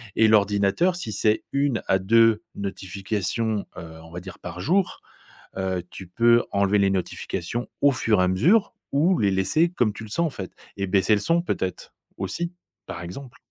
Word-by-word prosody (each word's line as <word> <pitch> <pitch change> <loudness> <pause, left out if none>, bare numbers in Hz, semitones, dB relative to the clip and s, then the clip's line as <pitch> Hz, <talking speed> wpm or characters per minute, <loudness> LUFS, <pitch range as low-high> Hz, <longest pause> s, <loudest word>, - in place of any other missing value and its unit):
et 110 - +5
l'ordinateur 105 - +3
si 115 -11 -4
c'est 105 +2 +1
1 140 -4 +1
à 95 - +4
2 115 +3 +4
notifications, 100 +2 -3
heu, 80 -1 -9
on 80 - -14
va 90 - -6
dire 90 +1 -10
par 90 0 -8
jour, 180 - 0 0.5
heu, 95 -2 -2
tu 95 - -9
peux 120 +5 +4
enlever 100 +1 +2
les 100 - +3
notifications 100 +5 -3
au 145 - +6
fur 115 -6 +1
et - - +4
à - - +2
mesure 170 - +3 0.2
ou 165 +6 +3
les 100 -2 +2
laisser 155 - +2
comme 120 -11 +1
tu 105 - -9
le 110 - -10
sens, 170 +10 0
en - - -2
fait 95 -8 -7 0.3
et 100 -1 -2
baisser 100 +3 +3
le 105 - +3
son, 170 +1 +2
peut-être, 95 - -4 0.2
aussi, 170 - -3 0.3
par 85 - -7
exemple? 120 +10 -9
105 Hz, 185 wpm, -24 LUFS, 95-130 Hz, 0.5 s, au